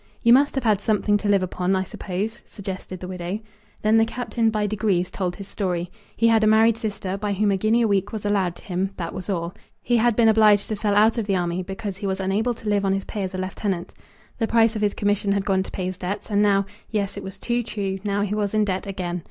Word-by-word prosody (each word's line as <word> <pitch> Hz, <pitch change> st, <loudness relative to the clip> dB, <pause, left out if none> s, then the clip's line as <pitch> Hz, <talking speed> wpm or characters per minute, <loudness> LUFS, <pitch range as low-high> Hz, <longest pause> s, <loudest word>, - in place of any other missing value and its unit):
"You 235 Hz, -, +7 dB
must 280 Hz, +3 st, +4 dB
have 270 Hz, -, -1 dB
had 210 Hz, -4 st, +2 dB
something 210 Hz, -1 st, +2 dB
to 205 Hz, 0 st, -2 dB
live 200 Hz, -2 st, +4 dB
upon, 185 Hz, +1 st, 0 dB
I 190 Hz, -, +1 dB
suppose?" 195 Hz, +4 st, -4 dB
suggested 185 Hz, -2 st, -7 dB
the 180 Hz, -, -5 dB
widow. 180 Hz, +2 st, -4 dB, 0.4 s
Then 215 Hz, +1 st, +4 dB
the 225 Hz, -, +4 dB
Captain, 235 Hz, -1 st, 0 dB
by 215 Hz, -1 st, 0 dB
degrees, 195 Hz, -3 st, 0 dB
told 180 Hz, -2 st, -2 dB
his 200 Hz, -2 st, -9 dB
story. 180 Hz, -4 st, -2 dB, 0.3 s
He 230 Hz, -, +4 dB
had 225 Hz, -1 st, +4 dB
a -, -, +4 dB
married 220 Hz, +1 st, +5 dB
sister 200 Hz, -4 st, -4 dB
by 205 Hz, 0 st, -1 dB
whom 205 Hz, +1 st, +2 dB
a 195 Hz, -, +2 dB
guinea 220 Hz, +4 st, +2 dB
a -, -, +3 dB
week 200 Hz, -1 st, +1 dB
was 215 Hz, -2 st, -5 dB
allowed 195 Hz, -4 st, +1 dB
to -, -, -15 dB
him. 190 Hz, -1 st, -2 dB
That 170 Hz, -, -4 dB
was 185 Hz, +2 st, -6 dB
all. 170 Hz, -2 st, -2 dB, 0.3 s
He 240 Hz, 0 st, +1 dB
had 235 Hz, 0 st, +3 dB
been 230 Hz, 0 st, +4 dB
obliged 215 Hz, -2 st, +5 dB
to 215 Hz, -, -1 dB
sell 205 Hz, 0 st, 0 dB
out 220 Hz, +3 st, +4 dB
of 215 Hz, -, -3 dB
the 195 Hz, -, +2 dB
army, 175 Hz, 0 st, -1 dB
because 195 Hz, +1 st, -5 dB
he 200 Hz, -, -4 dB
was 190 Hz, 0 st, -1 dB
unable 205 Hz, +6 st, 0 dB
to 220 Hz, -, -10 dB
live 205 Hz, -1 st, +2 dB
on 195 Hz, -1 st, +2 dB
his 195 Hz, 0 st, -2 dB
pay 210 Hz, -, -4 dB
as 190 Hz, -1 st, -3 dB
a -, -, -3 dB
lieutenant. 185 Hz, -1 st, -3 dB, 0.5 s
The 225 Hz, -, +1 dB
price 225 Hz, 0 st, +3 dB
of 215 Hz, -, -2 dB
his 205 Hz, -1 st, +1 dB
commission 205 Hz, -1 st, +1 dB
had 200 Hz, -1 st, -1 dB
gone 190 Hz, -1 st, +2 dB
to 190 Hz, -, -6 dB
pay 185 Hz, -, -3 dB
his 185 Hz, 0 st, -4 dB
debts, 195 Hz, +4 st, -4 dB
and 205 Hz, 0 st, +3 dB
now, 200 Hz, -1 st, +3 dB, 0.2 s
yes, 205 Hz, -2 st, -2 dB
it -, -, -5 dB
was 190 Hz, 0 st, -8 dB
too 240 Hz, +4 st, -1 dB
true, 195 Hz, -4 st, -3 dB
now 205 Hz, -1 st, 0 dB
he 205 Hz, 0 st, -2 dB
was 210 Hz, 0 st, -1 dB
in 215 Hz, -1 st, +3 dB
debt 190 Hz, 0 st, -2 dB
again. 180 Hz, -2 st, -3 dB
200 Hz, 265 wpm, -23 LUFS, 190-215 Hz, 0.5 s, You